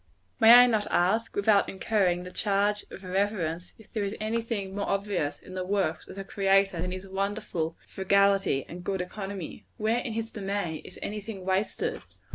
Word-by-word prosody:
May 225 0 +9
I 245 +1 +10
not 220 -4 +1
ask, 220 +6 +1
without 205 0 +3
incurring 190 -3 +1
the 180 - -8
charge 205 +1 +1
of 195 - -10
irreverence, 180 -3 -1
if 220 - -19
there 215 - -1
is 200 +2 -2
any 220 +2 -1
thing 205 -4 -4
more 200 0 -2
obvious, 195 -7 -1
in 185 - -12
the 185 0 -2
works 185 -4 -1
of - - -10
the 195 - -5
Creator, 195 -2 +2
than 180 +1 -2
his 185 +1 -6
wonderful 195 -4 -2
frugality 195 -6 +2
and 175 +1 -8
good 190 0 -1
economy? 195 -2 -6
Where, 220 +2 +1
in 240 -2 -4
his 225 0 -3
domain, 195 -6 -3
is - - -9
any 210 +1 -4
thing 195 -3 -8
wasted? 190 +2 -1
195 Hz, 185 wpm, -28 LUFS, 185-210 Hz, -, I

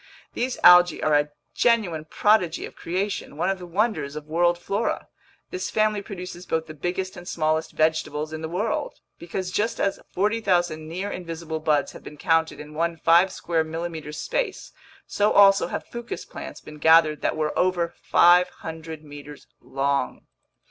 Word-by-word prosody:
These 250 +1 -2
algae 175 0 +7
are 155 - +2
a 145 0 +3 0.2
genuine 200 -10 +1
prodigy 185 -1 +2
of - - -12
creation, 185 -3 -3
one 175 +4 +1
of 190 - -4
the 180 - -9
wonders 190 -6 -1
of 150 -1 -6
world 175 +2 +2
flora. 200 +5 -2 0.4
This 370 0 -3
family 215 -1 +1
produces 180 -3 -8
both 160 0 -1
the 155 - -9
biggest 180 +4 -3
and 175 - -11
smallest 155 0 -1
vegetables 155 -1 0
in 160 - -5
the 160 - -4
world. 205 +6 -2 0.2
Because, 180 +2 -4
just 215 +4 -1
as 195 -1 0
40,000 175 -6 0
near 185 +5 -4
invisible 165 -2 -5
buds 150 -2 +1
have - - -12
been 150 - -10
counted 165 0 +1
in 150 0 -10
one 165 +1 -1
five 170 +4 +4
square 165 -2 -1
millimeter 160 -1 -5
space, 390 - -3 0.3
so 205 +1 +1
also 195 -1 +6
have - - -5
fucus 235 0 -7
plants - - -9
been 150 0 -12
gathered 160 -1 +5
that - - -1
were 155 -1 -1
over 175 -2 +1
500 160 -2 +2
meters 145 0 -11
long! 140 +1 -2
170 Hz, 160 wpm, -24 LUFS, 155-190 Hz, 0.4 s, algae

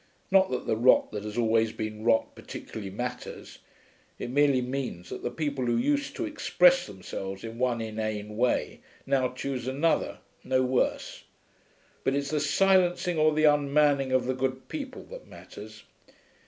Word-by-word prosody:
Not 190 0 +5
that 125 - -3
the - - +1
rot 120 +3 +4
that 105 -1 -5
has 105 +1 -6
always 115 -1 +2
been 110 -1 -5
rot 115 -1 +2
particularly 105 -3 -8
matters; 125 +5 -6 0.6
it 120 - -5
merely 140 -1 +4
means 125 -9 -4
that - - -6
the - - -2
people 140 -5 -2
who 120 - +2
used 285 +4 0
to - - -2
express - - +3
themselves 95 0 -7
in 115 +1 -7
one 125 -2 +1
inane 110 -1 -4
way 125 +3 0 0.3
now 135 -2 +1
choose 130 -1 -4
another, 145 +5 0 0.3
no 130 0 +1
worse; 130 0 -1 0.8
but 135 - +1
it's 140 0 -2
the 155 - +1
silencing 180 +2 +2
or 155 0 +5
the 155 0 0
unmanning 145 -2 +3
of 130 -1 +2
the 130 - 0
good 130 0 -3
people 275 -4 -6
that - - -11
matters. - - -12
130 Hz, 160 wpm, -28 LUFS, 115-150 Hz, 0.8 s, Not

